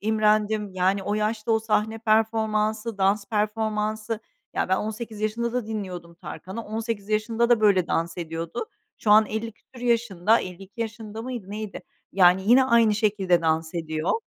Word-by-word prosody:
imrendim, 215 -1 +1
yani, 190 +2 +1
o 205 +2 -1
yaşta 215 +1 0
o 220 - +4
sahne 220 0 0
performansı, 220 0 +1
dans 200 +1 +2
performansı. 215 0 -1 0.3
Ya, - - 0
ben 190 - +3
18 215 +1 -5
yaşında 230 +2 -1
da 250 -3 -2
dinliyordum 185 -6 -6
Tarkan'ı, 190 +5 -7
18 220 -1 -4
yaşında 225 +2 +1
da 235 -2 +4
böyle 190 -5 +4
dans 165 +1 -1
ediyordu. 165 - -4 0.3
Şu 210 - 0
an 215 0 +7
elli 220 +1 -4
küsur 240 +3 -17
yaşında. 225 -3 +2
52 195 +5 -9
yaşında 220 0 -5
mıydı, 240 -6 -6
neydi? 210 -1 -6 0.3
Yani, 185 0 +5
yine 260 +2 +7
aynı 235 -4 +4
şekilde 200 -5 +2
dans 160 +1 0
ediyor. 160 - -1
215 Hz, 155 wpm, -25 LUFS, 195-225 Hz, 0.3 s, an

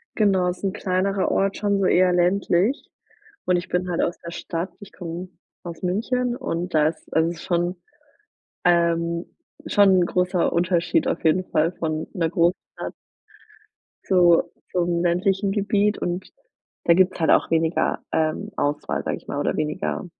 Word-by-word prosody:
Genau, 190 -4 +3
ist 180 - -6
'n 195 -1 0
kleinerer 195 0 0
Ort, 195 0 +1
schon 205 -1 0
so 195 - +1
eher 185 0 +4
ländlich 180 +5 +1 0.6
und 180 -1 +3
ich 175 +1 -5
bin 180 +1 -1
halt 170 - 0
aus 175 - -1
der 170 - -8
Stadt, 170 +1 -4
ich 205 -1 -12
komme 175 +1 -6 0.3
aus 170 -2 -8
München 240 +7 0
und 175 -6 -4
da 155 -1 +4
ist 160 - -12
also, 160 +1 +3
ist 175 - -9
schon, 175 0 0 0.9
ähm, 170 0 +2 0.4
schon 205 -1 +4
'n - - +1
großer 180 0 +1
Unterschied 175 -1 +1
auf - - -2
jeden 180 +4 +3
Fall 160 0 +1
von 155 -2 -3
'ner 165 -2 0
Großstadt 170 +2 -1 1.1
zu 175 -3 +5 0.3
zum 175 -1 0
ländlichen 190 +3 +1
Gebiet 205 0 +1
und 180 +1 -3 0.6
da 170 - +6
gibt 185 +1 +4
es - - -10
halt 160 - +3
auch - - +3
weniger, 165 0 +1
ähm, 160 +6 -1
Auswahl, 145 +1 -1
sage - - -2
ich - - -17
mal - - -3
oder - - 0
weniger 155 +5 -2
180 Hz, 165 wpm, -23 LUFS, 170-190 Hz, 1.1 s, da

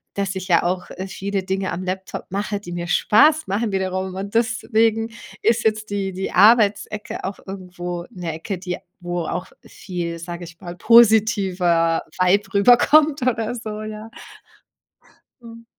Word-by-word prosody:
dass 200 -1 -1
ich 185 0 -5
ja 170 - +3
auch, 180 +1 -2
äh, 190 +1 -6
viele 195 0 -3
Dinge 190 0 -2
am 185 - -4
Laptop 190 +1 -5
mache, 205 +1 -3
die 175 - -9
mir 175 0 -4
Spaß 300 - +4
machen 205 +1 -1
wiederum 185 0 -2
und 200 +2 -6
deswegen 225 -1 +1 0.3
ist 230 - +2
jetzt 215 -1 0
die 195 -2 -2
die 190 +1 -4
Arbeitsecke 210 0 +3
auch 195 - -5
irgendwo 180 -2 -6
'ne 175 -5 -5
Ecke, 185 +4 -5
die 180 -1 -4 0.2
wo 175 0 -3
auch 180 +2 -4 0.2
viel, 170 -3 -6
sage 170 +1 -7
ich 165 0 -14
mal, 175 0 -7
positiver 195 -7 +4 0.2
Vibe 185 +3 +2
rüberkommt 275 +7 +5
oder 230 -2 0
so, 215 -2 -6
ja. 215 +1 -8 1.3
Mhm. 230 0 -12
195 Hz, 150 wpm, -21 LUFS, 180-220 Hz, 1.3 s, rüberkommt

